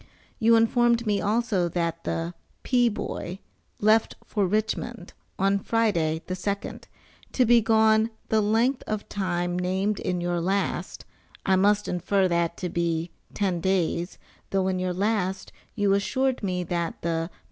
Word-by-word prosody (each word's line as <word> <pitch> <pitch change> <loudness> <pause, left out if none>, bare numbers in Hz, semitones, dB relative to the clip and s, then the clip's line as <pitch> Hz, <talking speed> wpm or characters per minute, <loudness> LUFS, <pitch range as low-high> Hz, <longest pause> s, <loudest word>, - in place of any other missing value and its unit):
You 230 0 +5
informed 235 +1 +3
me 205 -2 +1
also 210 -4 +1
that 170 -1 -2
the 165 +1 -2 0.3
"P. 245 -2 +3
Boy" 190 -4 -5 0.4
left 215 +1 +3
for 205 -4 0
Richmond, 215 0 -2 0.2
on 195 +1 +2
Friday, 175 -8 0
the 185 - -4
2d, 200 +2 -4 0.5
to 255 - +3
be 235 0 +5
gone 220 0 +4 0.2
the 220 -1 +3
length 230 +5 +2
of 215 -1 -3
time 175 -2 -1
named 190 +3 0
in 180 -1 -2
your 175 0 -1
last, 195 +3 -2 0.4
I 190 - +4
must 205 +2 +3
infer 185 +2 +1
that 170 -1 0
to 180 - -3
be 170 0 -1 0.2
ten 190 -4 0
days 180 -2 0 0.3
though 190 -1 +1
in 185 -1 0
your 185 0 -1
last 190 -1 -1 0.2
you 205 -3 +2
assured 260 +6 0
me 180 -3 -1
that 170 -1 -3
the 165 0 -1
"P. - - -28
195 Hz, 150 wpm, -26 LUFS, 175-220 Hz, 0.5 s, You